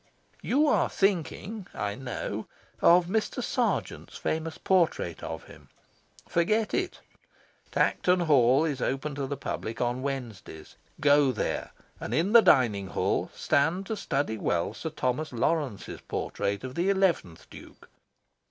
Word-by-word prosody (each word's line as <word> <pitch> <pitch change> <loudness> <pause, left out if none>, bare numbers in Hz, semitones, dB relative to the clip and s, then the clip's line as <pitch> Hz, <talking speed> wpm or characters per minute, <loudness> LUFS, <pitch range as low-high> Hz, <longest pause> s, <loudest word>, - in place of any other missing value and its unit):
You 290 +4 +2
are 295 - +3
thinking, 195 +2 -1
I 105 -1 -2
know, 125 +2 -5 0.3
of 175 +1 +6
Mr. 215 +5 -1
Sargent's - - -2
famous 160 0 -3
portrait 170 - +1
of - - -6
him. - - -16 0.6
Forget 215 +6 +1
it. 375 -1 -2 0.7
Tankerton 180 0 +2
Hall 140 -2 +4
is 140 -5 -2
open 135 +3 -2
to 140 -1 -3
the 140 +1 -4
public 115 -4 -5
on 120 +1 -1
Wednesdays. 115 - -6 0.2
Go 145 -2 +5
there, 110 - -2 0.3
and - - -3
in 180 +7 +1
the 235 - +10
dining 105 - +3
hall - - -1
stand 165 +7 +1
to 220 - -3
study 140 - -2
well 85 -3 0
Sir 160 - -5
Thomas 150 +1 -2
Lawrence's 130 -2 -2
portrait 100 +3 -3
of 130 -1 -6
the 175 +7 0
eleventh 180 - 0
Duke. - - -13
145 Hz, 135 wpm, -28 LUFS, 125-180 Hz, 0.7 s, the